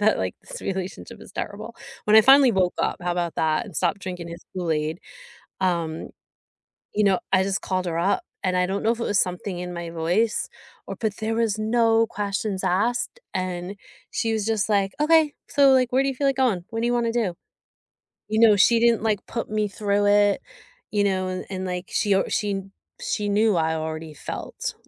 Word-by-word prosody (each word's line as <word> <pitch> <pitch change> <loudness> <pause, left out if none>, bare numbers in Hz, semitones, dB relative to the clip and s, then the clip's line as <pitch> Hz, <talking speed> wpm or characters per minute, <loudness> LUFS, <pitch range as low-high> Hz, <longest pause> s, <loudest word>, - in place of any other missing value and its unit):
that, 215 +1 +4
like, 95 -1 -2
"This - - -8
relationship 190 -1 -5
is - - -13
terrible." - - -6 0.3
When 210 +1 +5
I - - +11
finally 270 +1 +7
woke 185 -3 +1
up, - - 0
how 175 0 0
'bout 175 -2 -2
that? 160 +7 0
And 190 -7 -9
stopped 180 +2 +1
drinking 180 -2 -6
his 170 +1 -9
Kool-Aid, 160 -2 -1 0.6
um, 170 -3 -1 0.8
you 210 - +2
know, 195 -2 +3
I 190 -1 +4
just 195 0 -1
called 185 -1 -2
her 165 -1 -2
up, 185 +4 +1 0.2
and 185 -1 +1
I 180 - +3
don't 195 +2 -2
know 225 - +3
if 235 - -3
it - - -1
was 205 -4 +1
something 180 0 -2
in 180 0 -5
my 170 -1 -5
voice 175 +7 0 0.4
or - - -5
but, 220 -2 -2
there 225 +1 -2
was 225 -2 +1
no 225 +1 +3
questions 200 -2 -3
asked, 230 - 0
and 185 +1 -3 0.4
she 225 0 -1
was 215 -2 -1
just 220 -4 0
like, 200 -2 +1
"Okay, 310 -1 +4
so, 280 -1 +5
like, 255 -2 +3
where 265 +1 +4
do 275 - +1
you 270 - -4
feel 280 +2 0
like 275 - +2
going? 225 -10 +1
What 225 0 -2
do 235 - +1
you 245 - +1
wanna 235 -1 0
do?" 215 -8 0 0.9
You 215 +1 0
know, 220 -3 +7
she 230 +4 +5
didn't, 235 -1 +3
like, 215 -3 0
put 230 - -4
me 215 0 0
through 205 0 0
it, 205 0 +4 0.5
you 205 -1 +2
know, 190 -2 0
and 185 0 -4
and, 190 -1 -4
like, 180 0 -4
she 205 -2 +1
o 195 - +3
she 200 -4 -1 0.4
she 205 -1 -2
knew 210 0 +3
I 160 -1 +1
already 160 0 -5
felt 145 - -6
200 Hz, 205 wpm, -24 LUFS, 180-225 Hz, 0.9 s, I